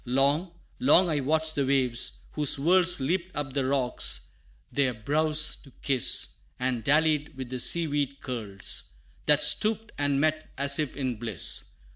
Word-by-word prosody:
Long, 140 +8 +1 0.3
long 190 -7 +4
I 150 -2 0
watched 155 +3 0
the 140 - 0
waves, 130 -3 -1
whose 150 -2 +2
whirls 180 +4 +3
Leaped 175 +7 -2
up 145 -3 -4
the 135 -2 -1
rocks, 130 -2 0 0.4
their 130 -4 0
brows 150 +6 +1
to 135 - -18
kiss, 135 -4 +3 0.2
And 125 -2 -2
dallied 150 +1 +1
with 130 -2 -7
the 130 - -4
sea 170 +6 +4
weed 140 -2 -2
curls, 110 -8 -5 0.3
That - - +5
stooped 220 0 +2
and 145 -1 +1
met, 155 +1 -1
as 140 +1 +1
if 150 -3 -3
in 130 -4 -3
bliss. 110 -6 -2
140 Hz, 155 wpm, -27 LUFS, 130-155 Hz, 0.4 s, That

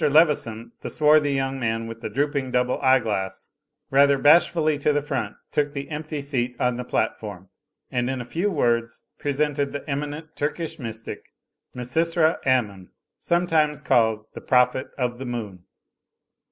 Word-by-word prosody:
Leveson, 140 -7 +2
the - - -5
swarthy 150 -1 +4
young 135 0 -1
man 115 -1 -1
with 115 0 -8
the - - -4
drooping 140 -1 -1
double 125 0 0
eyeglass 105 -8 +1 0.4
rather 140 +1 +5
bashfully 155 +1 +4
to 150 - +2
the 145 - +2
front, 130 -8 -3 0.2
took 145 -1 0
the 140 +2 -5
empty 150 0 -4
seat 125 -3 -2
on 125 -1 +1
the 125 - -3
platform, 100 -6 -3 0.4
and 125 -1 0
in 130 -1 -2
a 120 - -5
few 170 +11 -1
words 115 -7 0
presented 145 -1 0
the 145 - -6
eminent 150 +2 -4
Turkish 160 +2 -3
mystic 115 -3 -7 0.4
Misysra 160 +6 +2
Ammon, 105 -8 +1 0.3
sometimes 160 -4 +1
called 110 -5 +2
the - - -8
Prophet 125 0 +2
of 125 -2 -2
the 135 - -5
Moon. 105 -7 -6
135 Hz, 150 wpm, -24 LUFS, 120-150 Hz, 0.4 s, rather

